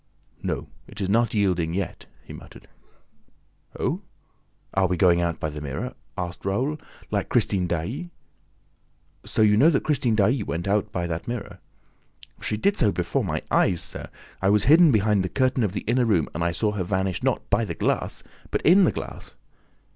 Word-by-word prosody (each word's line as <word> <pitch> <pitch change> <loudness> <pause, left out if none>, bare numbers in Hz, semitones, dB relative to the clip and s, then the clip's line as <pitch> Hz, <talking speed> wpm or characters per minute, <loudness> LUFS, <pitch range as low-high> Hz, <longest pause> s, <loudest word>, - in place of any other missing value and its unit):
"No, - - -3 0.2
it 105 - -11
is 95 -1 -1
not 115 +1 +2
yielding 90 -5 +1
yet," 95 -1 -4 0.2
he - - -11
muttered. - - -13 1.1
"Oh, - - -1 0.7
are 95 -1 +3
we 90 0 -1
going 85 -2 +4
out 85 -1 -1
by 80 - -2
the 75 0 -7
mirror?" 70 -2 -4 0.2
asked 90 -1 -5
Raoul. 130 +11 -1 0.3
"Like - - -1
Christine 90 -3 +1
Daae." 105 - -3 1.2
"So 110 - +2
you 105 -1 +5
knew 145 +8 +6
that 145 - +1
Christine 125 -7 +1
Daae 110 +5 +2
went 85 -2 -3
out 105 +1 +1
by 90 -3 -2
that 85 -1 -4
mirror?" 120 -3 -5 0.8
"She 105 - -2
did 200 - +1
so 105 - +3
before 90 -2 -1
my - - -2
eyes, 85 - +3
sir! - - -3 0.3
I 95 - +3
was 105 0 +4
hidden 160 +4 +7
behind 105 -3 +3
the 95 - -2
curtain 130 +5 +1
of 100 -3 -1
the - - -3
inner 120 +2 +1
room 95 -9 +2
and 85 - -2
I 85 - +1
saw 105 +5 0
her 105 -3 -2
vanish 95 -1 -1
not - - -1
by - - +3
the - - -4
glass, - - -1 0.3
but - - -2
in 185 +4 +6
the - - +3
glass!" - - -8
100 Hz, 185 wpm, -24 LUFS, 90-120 Hz, 1.2 s, hidden